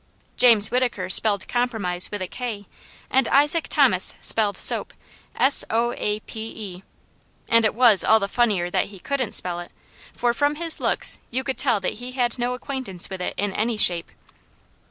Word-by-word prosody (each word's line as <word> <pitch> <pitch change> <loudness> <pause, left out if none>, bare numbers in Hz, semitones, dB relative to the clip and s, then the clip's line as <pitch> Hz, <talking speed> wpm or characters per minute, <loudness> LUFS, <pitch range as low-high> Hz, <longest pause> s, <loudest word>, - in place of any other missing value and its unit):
James 230 -4 +5
Whittaker 240 -7 -1
spelled 205 0 +1
compromise 220 -8 -1
with 205 -2 -5
a - - -5
k, 220 -2 -6 0.5
and 265 -2 +2
Isaac 295 +4 +3
Thomas - - +2
spelled 210 -2 +2
soap, - - +3 0.4
s 275 +2 +4
o 235 +2 0
a 210 +1 -3
p 220 - -9 0.3
e, 185 - -15 0.7
and 230 0 +4
it 215 - +1
was 230 -5 +5
all 220 - +4
the 200 - -2
funnier 200 -6 0
that - - 0
he 200 - -13
couldn't 255 +2 -3
spell 175 -1 0
it, 175 - -10 0.4
for 240 -1 -1
from 290 +4 0
his 330 0 -2
looks - - 0
you 260 +2 -3
could 265 -1 -4
tell 250 -6 +2
that 185 - -2
he 250 +1 -7
had 245 -1 -2
no 245 +1 -1
acquaintance 250 -10 -4
with 190 -1 -6
it - - -4
in 205 -1 -2
any 225 +2 -2
shape. 175 -5 +1
230 Hz, 180 wpm, -22 LUFS, 200-250 Hz, 0.7 s, James